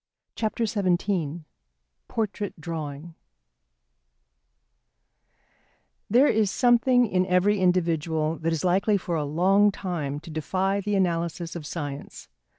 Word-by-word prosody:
XVII 195 -7 -1 0.7
PORTRAIT 210 -4 -3
DRAWING 155 -1 -6 3.0
There 245 +7 +5
is 215 -7 +2
something 245 +2 +4
in 185 -3 0
every 190 +3 +2
individual 165 -3 +1
that 165 +1 -1
is 165 0 -2
likely 195 +3 +3
for 175 -2 -3
a 155 - 0
long 190 +8 +3
time 160 -8 -4
to 165 - -11
defy 190 +5 -1
the 205 +1 -1
analysis 170 -2 -1
of 155 -4 -6
science. 145 -4 -7
180 Hz, 105 wpm, -25 LUFS, 165-200 Hz, 3.0 s, There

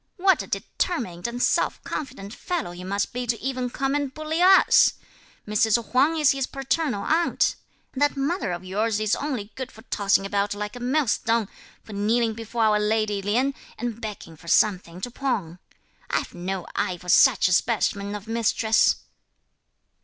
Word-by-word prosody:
"What 380 +1 +3
a - - -8
determined 230 - -3
and 240 +1 -3
self - - +1
confident 255 -8 -6
fellow 345 - -3
he 175 +1 -9
must 200 +2 -2
be 250 0 -3
to 230 -2 0
even 255 -2 -2
come 270 +2 -1
and 285 -2 -1
bully 310 +3 -3
us; 375 +1 +6 0.5
Mrs. 220 +2 +1
Huang 285 +6 +3
is 300 -4 +5
his 270 -1 -1
paternal 270 -5 -1
aunt! 335 +2 +2 0.4
That 290 +1 +1
mother 285 - -1
of 175 +1 -5
yours 210 +3 -1
is 215 -1 +1
only 250 -8 -4
good 260 -1 -6
for 220 - -15
tossing 200 -4 +1
about 200 0 -1
like 210 +1 -5
a - - -7
millstone, 235 -4 +1 0.3
for 215 - -11
kneeling 220 +3 +1
before 230 +1 -3
our 210 -1 +4
lady 210 -1 0
Lien, 245 +8 +1 0.2
and 235 -1 -4
begging 205 -6 -7
for 165 +2 -17
something 180 -2 +2
to 245 - -4
pawn. 205 - -3 0.5
I've - - -2
no 180 +1 -4
eye 180 - -1
for 180 - -15
such 235 +4 +5
a 185 - +1
specimen 205 -1 0
of 210 +1 -8
mistress." 225 -1 +2
225 Hz, 170 wpm, -24 LUFS, 200-270 Hz, 0.5 s, us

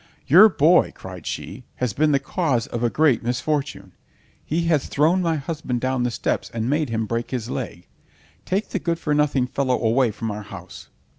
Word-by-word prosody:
"Your 190 +10 +8
boy," 165 0 +4
cried - - -9
she, - - -6
"has 125 -5 -2
been 150 +5 +2
the 140 - +4
cause 135 -3 -1
of 120 - -5
a 120 - +2
great 145 -3 +3
misfortune! 125 -2 -2 0.5
He 165 +3 -1
has 160 -5 +1
thrown 165 +6 +2
my 165 -2 +1
husband 145 -4 -3
down 130 0 -1
the 125 - +1
steps 115 - -2
and 115 0 -1
made 150 +1 0
him 115 -1 -1
break 115 +2 -3
his 125 -2 -4
leg. 100 -9 -5 0.6
Take 195 +3 -2
the 200 - -2
good 170 -1 -1
for 150 -2 -1
nothing 145 -3 +2
fellow 130 0 0
away 120 +2 +2
from 110 +1 -4
our 105 +1 -5
house." 95 -3 -11
130 Hz, 195 wpm, -23 LUFS, 115-155 Hz, 0.6 s, Your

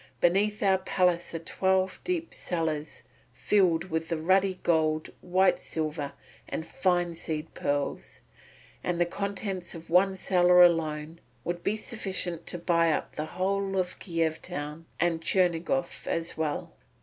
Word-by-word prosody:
Beneath 205 +5 +2
our 190 -1 +4
palace 180 -2 +1
are - - +1
twelve 190 +3 0
deep 345 -2 -2
cellars 160 -3 -3 0.3
filled 185 -4 +2
with 160 +1 -2
ruddy 185 +4 +2
gold, 155 -2 +1
white 185 +1 +3
silver, 155 -2 -3 0.4
and 160 - -3
fine 175 -6 +1
seed 160 -1 -4
pearls, 145 0 -2 0.6
and 175 -1 -1
the 175 - +4
contents 195 -1 -4
of 165 0 -10
one 190 +2 +4
cellar 180 -1 +5
alone 160 -1 +1 0.2
would 175 0 -3
be 215 - 0
sufficient 190 -6 -3
to 175 - -2
buy 170 -1 +3
up - - -2
the 155 - -2
whole 195 +1 0
of 180 -1 -1
Kiev 165 -3 -1
town 155 -1 -5
and 165 -1 +1
Chernigof 180 +9 +1
as 165 0 -2
well." 155 -2 -2
175 Hz, 135 wpm, -28 LUFS, 160-190 Hz, 0.6 s, cellar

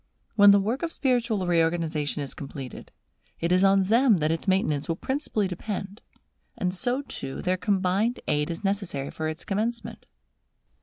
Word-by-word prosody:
When 205 -1 +8
the 200 0 +7
work 225 +7 -1
of 335 - -2
spiritual 235 - 0
reorganization 165 -4 0
is 135 - -6
completed, 135 -2 -8 0.5
it 170 +1 -1
is 185 +1 +4
on 195 0 +5
them 225 +2 +4
that 155 -1 +1
its 165 +4 -3
maintenance 160 -7 +1
will 165 - +1
principally 260 - -1
depend; 195 +2 -5 0.6
and 180 -1 -1
so 245 +8 0
too, 135 - -6
their 185 0 +1
combined 195 +4 0
aid 150 +1 +1
is 170 +3 -5
necessary 195 -9 -2
for 160 - -3
its 155 +2 -4
commencement. 225 +4 -3
190 Hz, 160 wpm, -26 LUFS, 165-215 Hz, 0.6 s, When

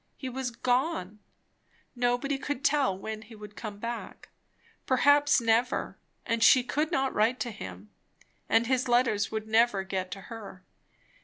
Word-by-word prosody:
He 260 - -5
was 260 0 -3
gone; 245 - -1 0.8
nobody 245 +3 0
could 285 -1 -4
tell 275 -10 +2
when 215 +2 -6
he 225 +1 -13
would 210 -1 -11
come 210 -3 -7
back; 230 +2 -7 0.6
perhaps 285 +2 +4
never; 230 +2 +1 0.3
and 230 0 0
she 255 -2 +7
could 300 +6 -1
not 270 -5 0
write 225 +4 +2
to 240 - -2
him, 95 - -9 0.6
and 225 +1 +4
his 255 +1 0
letters 240 -4 +2
would 220 0 -4
never 220 -3 +3
get 190 -1 -3
to 195 +2 -7
her. 200 -4 -10
235 Hz, 150 wpm, -28 LUFS, 210-260 Hz, 0.8 s, she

